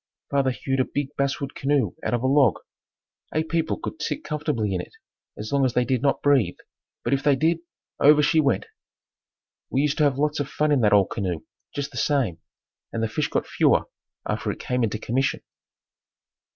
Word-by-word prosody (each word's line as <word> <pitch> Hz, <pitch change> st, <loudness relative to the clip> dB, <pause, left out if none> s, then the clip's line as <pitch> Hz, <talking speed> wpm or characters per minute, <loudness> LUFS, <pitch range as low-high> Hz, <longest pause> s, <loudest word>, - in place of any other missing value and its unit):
Father 140 Hz, -2 st, +2 dB
hewed 135 Hz, +1 st, -2 dB
a -, -, +5 dB
big 145 Hz, +2 st, -4 dB
basswood 140 Hz, 0 st, -1 dB
canoe 140 Hz, -1 st, +1 dB
out -, -, +1 dB
of 120 Hz, -, -3 dB
a -, -, +1 dB
log. 135 Hz, -4 st, +4 dB, 0.8 s
Eight 160 Hz, +1 st, 0 dB
people 165 Hz, -1 st, 0 dB
could 160 Hz, -, -6 dB
sit -, -, -3 dB
comfortably 145 Hz, -10 st, -1 dB
in 90 Hz, -, -1 dB
it -, -, -12 dB, 0.4 s
as 110 Hz, -, -6 dB
long 140 Hz, -1 st, +2 dB
as 130 Hz, -3 st, +1 dB
they 125 Hz, -, +3 dB
did 130 Hz, -2 st, 0 dB
not 140 Hz, 0 st, +1 dB
breathe, 135 Hz, -11 st, +3 dB, 0.5 s
but -, -, 0 dB
if 135 Hz, -, +1 dB
they 145 Hz, -2 st, +4 dB
did, 160 Hz, +4 st, +2 dB, 0.4 s
over 150 Hz, +1 st, +6 dB
she 160 Hz, +2 st, +3 dB
went! 140 Hz, -3 st, +2 dB, 1.0 s
We 135 Hz, -, +1 dB
used 150 Hz, +1 st, 0 dB
to -, -, +4 dB
have 140 Hz, -2 st, +1 dB
lots 150 Hz, +1 st, 0 dB
of 145 Hz, -1 st, -2 dB
fun 150 Hz, 0 st, 0 dB
in 140 Hz, -4 st, +3 dB
that 105 Hz, -, +4 dB
old 100 Hz, -3 st, +4 dB
canoe 90 Hz, -6 st, -2 dB, 0.3 s
just 145 Hz, 0 st, -3 dB
the -, -, -9 dB
same 130 Hz, -, +1 dB, 0.5 s
and 115 Hz, -, -2 dB
the -, -, +2 dB
fish 145 Hz, +7 st, -1 dB
got -, -, -1 dB
fewer -, -, +3 dB, 0.4 s
after -, -, -2 dB
it -, -, -4 dB
came 125 Hz, -1 st, -1 dB
into 110 Hz, -1 st, 0 dB
commission. 130 Hz, +5 st, -1 dB
140 Hz, 200 wpm, -24 LUFS, 120-145 Hz, 1.0 s, over